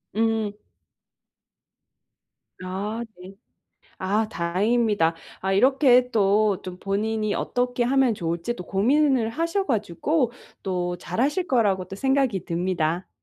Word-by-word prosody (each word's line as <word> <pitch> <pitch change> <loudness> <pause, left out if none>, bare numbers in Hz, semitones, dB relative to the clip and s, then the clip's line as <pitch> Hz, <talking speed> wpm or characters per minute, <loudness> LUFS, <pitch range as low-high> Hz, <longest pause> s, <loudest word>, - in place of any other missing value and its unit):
음. 220 -2 0 2.1
아. 205 +5 -4 0.2
네. 190 +2 -11 0.6
아 210 +3 0
다행입니다. 190 0 +1 0.2
아 190 +1 -1
이렇게 255 +2 +4
또 205 -1 +2
좀 180 -1 -7
본인이 215 +1 -1
어떻게 245 0 -1
하면 265 -1 +3
좋을지 170 +5 -3
또 180 - -7
고민을 255 +3 +2
하셔 335 - -1
가지고 240 - 0 0.3
또 180 -2 -2
잘 180 +6 -3
하실 345 +7 0
거라고 205 -7 +2
또 190 - -8
생각이 265 -6 +1
듭니다. 175 0 -1
215 Hz, 220 characters per minute, -24 LUFS, 185-245 Hz, 2.1 s, 이렇게